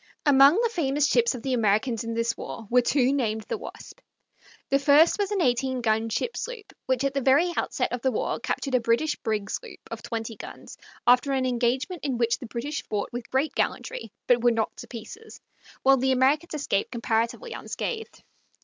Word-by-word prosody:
Among 280 +1 +7
the 470 0 +2
famous 290 -7 +1
ships 470 - +2
of 235 - -8
the 265 - -1
Americans 225 +1 +1
in 230 0 -4
this 230 0 0
war 225 - -7
were 250 0 +6
two 260 +1 +2
named 220 -5 0
the - - -4
Wasp. - - -10 0.7
The 275 - +3
first 290 +7 +5
was 405 -1 0
an 400 -4 0
eighteen 255 +1 +1
gun 220 0 +1
ship 460 - -2
sloop, 480 -4 -6
which 260 0 +1
at 275 -1 0
the 275 - 0
very 290 +7 +3
outset - - -1
of 245 - -3
the 260 - +2
war 220 - -2
captured 275 - -3
a 255 - +5
British 235 +6 +1
brig 210 -3 -2
sloop 480 - -6
of - - -5
twenty 225 -1 -5
guns, - - -10 0.3
after 250 +3 +4
an 260 -1 +1
engagement 255 +7 -1
in 265 -4 -1
which 235 0 +1
the 250 - -8
British 260 +6 -4
fought 210 +2 -3
with 240 0 -6
great 270 +4 0
gallantry, - - -2
but 240 -1 +3
were 240 - +6
knocked 225 -2 -1
to - - -8
Pieces, 255 - -10 0.4
while 270 0 +6
the 265 +1 +1
Americans 290 +6 +2
escaped 235 -9 -1
comparatively 235 - -1
unscathed. 450 -2 -5
260 Hz, 195 wpm, -26 LUFS, 230-290 Hz, 0.7 s, Among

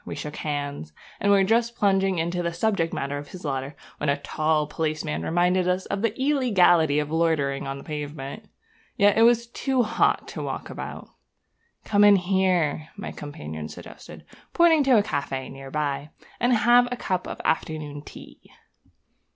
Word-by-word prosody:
We - - -6
shook 150 0 -6
hands, 145 - -4 0.3
and 200 - +2
were 200 -1 +5
just 230 +3 +1
plunging 195 -3 +2
into 170 +2 -1
the 170 -1 -2
subject 170 -2 0
matter 140 +1 -3
of 145 - -9
his 185 - -10
letter 135 0 -3 0.2
when 150 - -1
a 140 - +2
tall 155 +1 0
policeman 155 - -3
reminded 180 - +1
us 180 +1 0
of 200 - -3
the 230 +1 -1
illegality 195 - +3
of 150 0 -1
loitering 155 -5 0
on 135 0 -4
the - - -10
pavement. 150 +5 -6 0.5
Yet 205 0 +5
it 225 - +3
was 235 0 +5
too 255 +2 0
hot 225 - +1
to - - -6
walk - - -5
about. - - -7 0.8
'Come 205 -1 +3
in 205 -1 +8
here,' 180 -5 +1
my 200 - -6
companion 80 - -7
suggested, - - -12 0.3
pointing 335 -3 +5
to 260 -3 +5
a 205 - +4
café 140 -6 -3
near 135 0 -10
by, 145 0 -2 0.3
'and 245 +2 +2
have 240 +2 +5
a 250 - -2
cup 185 -4 -2
of - - -6
afternoon 155 -2 -2
tea.' - - -13
165 Hz, 170 wpm, -25 LUFS, 145-205 Hz, 0.8 s, in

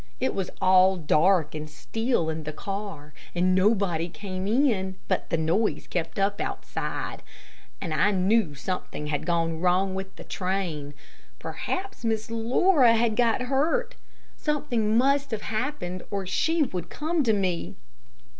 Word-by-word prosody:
It 260 - 0
was 190 -2 -2
all 185 0 +5
dark 160 0 +3
and 155 0 -5
still 225 +1 -1
in 160 0 -4
the 155 0 -5
car, 195 -4 -6 0.2
and 180 +1 +3
nobody 185 -4 +2
came 185 +3 -5
in, 215 -6 +2
but - - -1
the 165 - +1
noise 170 +8 +1
kept 170 -2 -3
up 200 +1 +1
outside, - - -4 0.6
and 165 -5 -3
I 195 +6 +3
knew 190 -4 +2
something 150 +1 -4
had 150 +1 -2
gone 165 -2 0
wrong 185 +2 +2
with 190 0 -5
the - - -10
train. 175 -7 -3 0.4
Perhaps 390 -7 -4
Miss 220 -1 -1
Laura 240 +3 +4
had 225 -1 +2
got 235 +1 +2
hurt. 320 - +1 0.4
Something 240 -8 0
must 275 +3 +3
have 220 -2 -3
happened 215 -6 -3
to - - -13
her 200 -1 -3
or - - -7
she 320 - +2
would 180 - -4
come 320 +2 -1
to 235 -5 +3
me. 185 -4 -1
195 Hz, 155 wpm, -26 LUFS, 175-230 Hz, 0.6 s, all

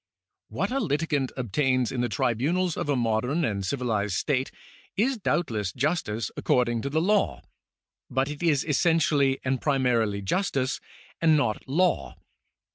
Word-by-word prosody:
What - - -2
a 270 - 0
litigant 150 - 0
obtains 130 +1 +1
in 125 -2 -2
the 120 - 0
tribunals 150 - 0
of - - -3
a 145 - +3
modern 125 +7 0
and 100 -5 -2
civilized 105 -4 -1
state 135 +2 0 0.5
is 245 +4 +1
doubtless 110 - -1
justice 125 - -1
according 120 -2 +1
to 140 - -3
law, 180 +8 +1 0.7
but 130 +1 0
it 150 +1 -6
is 155 -5 +2
essentially 145 -4 +2
and 130 0 0
primarily 120 -8 +1
justice 135 - 0 0.4
and 160 -2 +5
not 120 -7 0
law. 150 - +1
135 Hz, 135 wpm, -26 LUFS, 120-160 Hz, 0.7 s, and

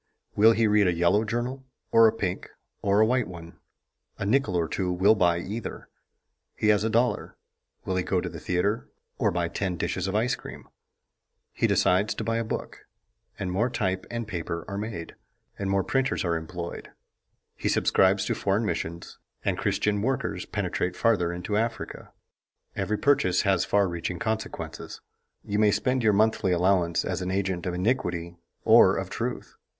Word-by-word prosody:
Will 110 +2 +6
he 115 0 +2
read 105 -2 +4
a 90 - +2
yellow 85 +5 +3
journal 120 +4 -3 0.3
or 115 0 +7
a - - +4
pink 100 -5 -3 0.3
or 100 +1 +3
a - - +6
white 125 +1 +1
one? 85 -2 -11 0.6
A - - -3
nickel 125 -2 +2
or 85 -2 +1
two 90 +2 -2
will 95 +4 +4
buy 90 -5 +2
either. 105 +6 -6 0.7
He 105 - +1
has 105 -1 +4
a 110 - +1
dollar; 115 0 0 0.5
will 95 - -1
he - - +2
go 90 0 0
to 90 - -3
the 85 -1 -7
theater 90 +7 -1 0.3
or - - +3
buy 85 -1 -1
ten 90 +1 -3
dishes 90 +2 -2
of 95 - -2
ice 120 +4 +2
cream? - - -8 0.8
He - - +1
decides 95 +4 +2
to - - -4
buy 115 0 0
a 115 - 0
book, 110 - -6 0.5
and 90 -2 -3
more 110 +7 +1
type 95 -6 -2
and 115 -2 -4
paper 85 -3 -4
are 100 - -5
made, 100 -5 -5 0.5
and 100 -1 -2
more 95 0 +2
printers 135 +1 0
are 85 -1 +1
employed; 85 +1 -6 0.7
he - - -2
subscribes 95 +1 +3
to - - 0
foreign 100 +3 0
missions 85 -4 -4 0.3
and - - +1
Christian 105 -1 0
workers 130 +3 -2
penetrate 90 0 -2
farther 95 -7 +2
into 90 +4 -2
Africa. 115 +1 -3 0.6
Every 105 - -1
purchase 95 -11 +2
has 95 -3 +2
far 100 -1 +2
reaching 85 0 -4
consequences. 110 0 -4 0.4
You 105 0 -2
may 105 -1 +5
spend 130 +5 +1
your 110 -2 +3
monthly 105 -3 +2
allowance 90 -1 +2
as - - -2
an 90 - -3
agent 95 -2 -1
of 90 - -2
iniquity 90 -5 -1 0.3
or - - +6
of - - -4
truth. - - -4
100 Hz, 175 wpm, -26 LUFS, 90-110 Hz, 0.8 s, or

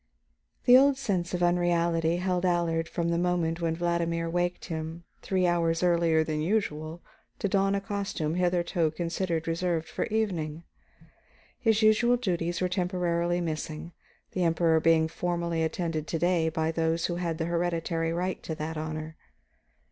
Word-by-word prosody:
The 245 - +8
old 275 0 +4
sense 185 -9 -1
of 175 - -1
unreality 170 -1 +2
held 180 0 -1
Allard 170 -2 +1
from 170 -1 -1
the 170 0 +1
moment 175 -1 0
when 165 -1 0
Vladimir 170 -1 0
awakened 175 +1 -1
him 160 0 -5 0.2
three 185 -1 0
hours 170 -1 +1
earlier 170 -2 +3
than 155 -1 -2
usual 160 -3 -2 0.3
to - - -1
don 195 0 +2
a 200 - -1
costume 200 -7 -3
hitherto 175 -2 +1
considered 170 0 -2
reserved 165 -1 -1
for - - -2
evening. 170 -8 -2 1.0
His 225 -1 +2
usual 235 +3 +4
duties 175 -6 -2
were 185 - +2
temporarily 175 -1 0
missing, 155 0 -4 0.4
the 185 - -2
Emperor 165 -1 +3
being 160 0 +4
formally 170 0 -2
attended 160 -1 -2
to 165 - -1
day 170 -1 +2
by 160 0 -1
those 165 0 0
who 175 - -2
had 170 -2 -2
the 165 - -1
hereditary 170 -1 -1
right 180 +2 -2
to 160 - -5
that 160 +1 -4
honor. 155 0 -5
170 Hz, 155 wpm, -28 LUFS, 165-180 Hz, 1.0 s, The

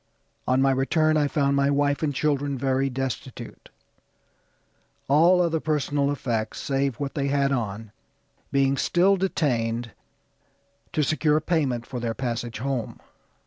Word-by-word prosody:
On 130 +1 +3
my 135 - +4
return 155 +4 +2
I 150 -1 +2
found 140 -2 +1
my 140 0 +2
wife 145 0 +1
and 155 -2 0
children 140 -1 -1
very 135 +1 0
destitute; 130 0 -6 1.4
all 165 +6 +5
other 165 -1 0
personal 145 -2 0
effects, 115 -6 -3
save 135 -2 -1
what 140 +2 -4
they 140 -1 -1
had 140 0 +1
on, 110 -4 -3 0.6
being 135 0 +2
still 185 +6 +3
detained 120 -11 -1 1.0
to 155 - +1
secure 155 +1 +2
payment 145 -8 -1
for 125 - -6
their 115 -1 -3
passage 120 -2 -3
home. 125 -1 -3
140 Hz, 135 wpm, -25 LUFS, 125-150 Hz, 1.4 s, all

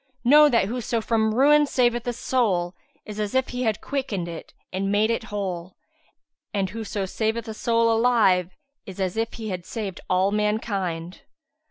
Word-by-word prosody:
Know 295 +4 +7
that 230 -7 +3
whoso 235 +1 -2
from 220 -1 +1
ruin 295 +3 +5
saveth 240 -3 +1
a 245 - 0
soul, 195 -9 0 0.3
is 210 0 -7
as 210 +2 -2
if 260 0 +2
he 250 - -4
had 220 -4 0
quickened 230 -11 -3
it 170 -1 -8 0.2
and 195 +1 -1
made 215 +2 +3
it 230 -1 -2
whole; 190 -5 -4 0.8
and 195 -3 -1
whoso 210 -2 -4
saveth 220 +4 -2
a 220 - -4
soul 230 +1 +2
alive, 210 -7 +3 0.3
is 190 0 -9
as 185 -2 -1
if 225 0 -2
he 220 -2 -6
had 180 -2 -4
saved 200 -1 -5
all 185 +2 +2
mankind. 200 -5 -2
215 Hz, 170 wpm, -24 LUFS, 190-235 Hz, 0.8 s, Know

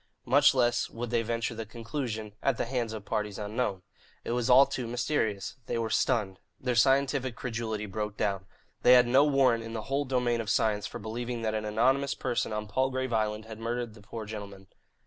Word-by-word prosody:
Much 145 +2 +5
less 120 -2 +2
would 120 0 -5
they 120 -1 +2
venture 115 +1 -2
the 115 0 -5
conclusion, 115 -1 -5
"at 135 -4 +1
the - - -1
hands 120 -2 -2
of 110 -2 -7
parties 105 -2 -2
unknown." 105 -2 -2 0.4
It - - -4
was 120 +1 0
all 130 +2 +8
too 125 -3 -4
mysterious. 120 -4 -1
They - - -1
were 115 -1 -2
stunned. 105 -7 +1 0.2
Their 125 -1 -1
scientific 135 0 +2
credulity 115 -3 -3
broke 105 +1 -4
down. 100 -1 -1 0.3
They 125 - +7
had 125 -1 +7
no 130 +4 +5
warrant 135 -5 +3
in 115 0 -7
the 110 -2 -4
whole 140 +4 -1
domain 125 -3 +1
of 110 - -5
science 105 -1 +1
for - - -7
believing 115 +2 -4
that 110 -1 0
an 110 0 -2
anonymous 130 +6 +2
person 120 -3 -1
on 105 0 -3
Palgrave 130 +2 -1
Island 110 -1 0
had 110 -1 -9
murdered 120 0 -3
the 110 - -15
poor 110 +1 -7
gentlemen. 100 -3 -8
115 Hz, 200 wpm, -29 LUFS, 110-125 Hz, 0.4 s, all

